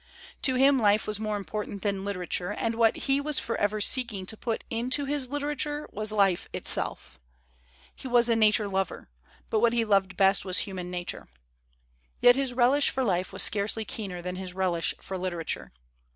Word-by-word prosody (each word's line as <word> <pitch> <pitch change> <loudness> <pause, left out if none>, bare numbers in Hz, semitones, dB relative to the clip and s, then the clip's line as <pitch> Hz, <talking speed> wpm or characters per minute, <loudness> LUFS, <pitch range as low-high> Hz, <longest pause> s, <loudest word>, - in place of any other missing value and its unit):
To 260 -3 +2
him 270 +1 +4
life 210 -1 +3
was 210 -1 -3
more 215 -1 -2
important 205 -1 -5
than 200 -2 -1
litera 195 -3 -4
ture, 180 +1 -2
and 230 - -1
what 225 -1 +3
he 275 0 +2
was 300 0 +1
forever 215 -4 -1
seeking 215 -3 0
to 220 - -5
put 225 +1 -3
into 250 +5 -1
his 275 -2 -1
literature 295 +1 -3
was 215 +1 -4
life 195 -4 +1
itself. 60 - 0 0.8
He - - -9
was 240 -1 +4
a 230 - +3
na 215 -1 +5
ture 215 -1 +1
lover, 190 - -3 0.4
but 220 - +2
what 235 +1 +3
he 235 -1 +1
loved 195 -3 +1
best 195 -1 +4
was 185 -2 0
human 185 -3 -2
nature. 180 -1 -5 0.9
Yet 245 0 +7
his 270 -1 -1
relish 255 +4 +3
for 265 - -1
life 185 -5 0
was - - +3
scarcely 215 +2 +1
keener 190 -4 -6
than 180 0 -4
his 185 -1 -5
relish 180 -3 0
for 190 -1 -5
literature. 175 -3 -4
215 Hz, 185 wpm, -27 LUFS, 190-245 Hz, 0.9 s, Yet